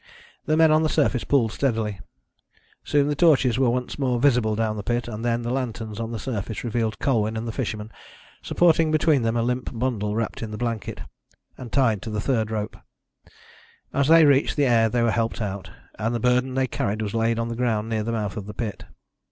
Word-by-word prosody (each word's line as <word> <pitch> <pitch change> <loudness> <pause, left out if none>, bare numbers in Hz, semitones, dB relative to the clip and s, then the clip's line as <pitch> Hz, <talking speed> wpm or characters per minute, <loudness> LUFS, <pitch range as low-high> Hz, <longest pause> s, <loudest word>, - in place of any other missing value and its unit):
The 155 - +2
men 160 -1 +6
on 155 0 +4
the 155 - +1
surface 140 -6 +1
pulled 120 -6 +2
steadily. 110 -7 -1 0.8
Soon 145 -1 +2
the 150 - +1
torches 135 -6 +3
were 130 -2 +3
once 125 +3 -2
more 125 -3 +1
visible 120 -5 +3
down 110 -1 -1
the 105 - -4
pit, 120 +4 -2
and 115 -1 -6
then 120 0 0
the 120 - -2
lanterns 115 -4 -4
on 115 -1 -3
the 115 - -3
surface 110 -1 -4
revealed 115 -2 -1
Colwyn 110 -4 0
and 115 +1 -4
the - - -2
fisherman, 105 0 -4 0.5
supporting 165 -2 +3
between 155 -2 +3
them 115 0 0
a 115 - +1
limp 125 +1 -1
bundle 110 -4 -2
wrapped 115 -1 -3
in 110 - -4
the 105 - -6
blanket, 115 -3 -3 0.5
and 125 -3 -9
tied 115 -8 +2
to - - -6
the 105 -1 -2
third 110 -1 0
rope. 105 -1 -4 1.2
As 140 0 +2
they 165 0 +7
reached 140 -1 +3
the 145 - +2
air 115 -3 +4
they 120 +2 +1
were 115 - +3
helped 115 +1 -1
out, 100 -3 -4 0.3
and 115 +2 -1
the - - -1
burden 125 +2 +1
they 130 0 +2
carried 110 -3 -2
was 105 - -4
laid 115 0 +1
on 115 0 -2
the 115 - -4
ground 115 -3 0
near 110 -1 -1
the 115 +2 -2
mouth 105 -3 -3
of 100 -2 -6
the 105 - -8
pit. 105 -5 -5
115 Hz, 215 wpm, -24 LUFS, 110-130 Hz, 1.2 s, they